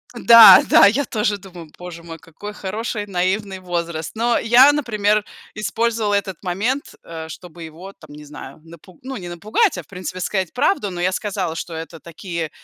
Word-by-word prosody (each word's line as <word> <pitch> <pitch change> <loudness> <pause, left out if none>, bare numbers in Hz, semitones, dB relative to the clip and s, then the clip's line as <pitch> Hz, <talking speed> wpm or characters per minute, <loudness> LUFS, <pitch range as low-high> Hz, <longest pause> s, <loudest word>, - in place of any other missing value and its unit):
да, 230 -5 +9
да, - - +7
я 260 +8 0
тоже 210 -2 -1
думаю: 180 -4 -13
"Боже 175 -1 -10
мой, 165 -1 -10
какой 165 +6 -11
хороший 210 +2 -5
наивный 190 +1 -2
возраст". 170 -2 -5
Но 235 +1 +1
я, 245 +5 +6
например, 215 -7 0 0.3
использовала 215 +1 -1
этот 190 -4 -3
момент, 215 +10 -3
э, 160 -1 -8
чтобы 175 +1 -12
его, 170 +5 -11
там 155 -5 -16
не 150 0 -12
знаю, 145 -1 -11
напу 170 +1 -16
ну 265 +1 -6
не 175 -3 -8
напугать, 215 - 0
а, - - -6
в - - -28
принципе, 185 -1 -7
сказать 185 -1 -2
правду, 250 - 0
но 180 -2 -7
я 180 +1 0
сказала, 190 -4 -3
что 165 0 -6
это 165 +1 -8
такие 170 0 -6
190 Hz, 180 wpm, -20 LUFS, 170-215 Hz, 0.3 s, да